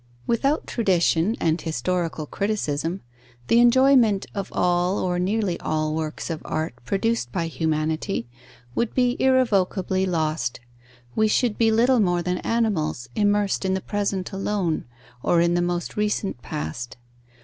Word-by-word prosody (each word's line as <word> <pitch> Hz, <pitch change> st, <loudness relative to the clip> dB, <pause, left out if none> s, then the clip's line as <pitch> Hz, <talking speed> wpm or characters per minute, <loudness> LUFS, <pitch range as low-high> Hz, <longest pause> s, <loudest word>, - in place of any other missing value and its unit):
Without 275 Hz, +6 st, +1 dB
tradition 185 Hz, -2 st, +2 dB
and 165 Hz, +1 st, +1 dB
historical 165 Hz, +1 st, -2 dB
criticism, 180 Hz, -3 st, -2 dB, 0.5 s
the 230 Hz, -, +5 dB
enjoyment 240 Hz, -4 st, +5 dB
of 200 Hz, -2 st, -4 dB
all 180 Hz, +2 st, +1 dB
or 180 Hz, -1 st, -1 dB
nearly 195 Hz, -1 st, 0 dB
all 155 Hz, 0 st, -1 dB
works 155 Hz, +1 st, -3 dB
of 160 Hz, -, -4 dB
art 155 Hz, -3 st, -2 dB
produced 200 Hz, -, 0 dB
by 165 Hz, -, -1 dB
humanity, 160 Hz, -, -1 dB, 0.5 s
would 235 Hz, -, -1 dB
be 250 Hz, -1 st, +2 dB
irrevocably 195 Hz, -7 st, +2 dB
lost: 155 Hz, -7 st, -1 dB, 0.6 s
we 220 Hz, -, +3 dB
should 220 Hz, 0 st, +1 dB
be 225 Hz, -1 st, +3 dB
little 240 Hz, +3 st, +4 dB
more 175 Hz, -4 st, +2 dB
than 180 Hz, +1 st, -1 dB
animals, 185 Hz, -, -1 dB
immersed 205 Hz, -1 st, +1 dB
in 190 Hz, 0 st, +1 dB
the -, -, -1 dB
present 200 Hz, -2 st, -2 dB
alone, 195 Hz, -4 st, -1 dB, 0.4 s
or 170 Hz, -, +3 dB
in 170 Hz, 0 st, +3 dB
the 175 Hz, -, +2 dB
most 175 Hz, 0 st, -2 dB
recent 210 Hz, -, -1 dB
past. 115 Hz, +13 st, -5 dB
185 Hz, 140 wpm, -24 LUFS, 160-215 Hz, 0.6 s, the